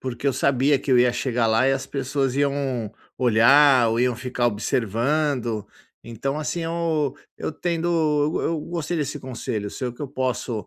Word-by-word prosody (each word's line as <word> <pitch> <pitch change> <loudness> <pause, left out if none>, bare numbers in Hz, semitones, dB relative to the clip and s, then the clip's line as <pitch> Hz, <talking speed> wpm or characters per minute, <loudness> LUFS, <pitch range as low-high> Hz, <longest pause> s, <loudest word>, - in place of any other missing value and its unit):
porque 130 +1 -5
eu 135 - +3
sabia 140 +2 +2
que 140 - -5
eu 125 - +6
ia 120 0 +4
chegar 120 -3 0
lá 115 +4 +3
e - - +3
as 135 -1 -2
pessoas 135 -1 -2
iam 135 -6 -1 0.3
olhar 125 +2 +5
ou 115 - 0
iam 125 -1 +1
ficar 125 -1 -1
observando. 120 +2 -1 0.4
Então 135 +5 -4
assim, 155 +3 -3
eu 165 -4 -1 0.2
eu - - -3
tendo 170 +2 -2
eu 155 -3 +1
eu 165 -1 -1
gostei 170 +1 -4
desse 145 -1 -2
conselho 120 -5 -4
seu. 125 +2 -4
O - - -13
que 145 - -9
eu 140 - -4
posso 125 -5 -3
135 Hz, 180 wpm, -23 LUFS, 120-145 Hz, 0.4 s, eu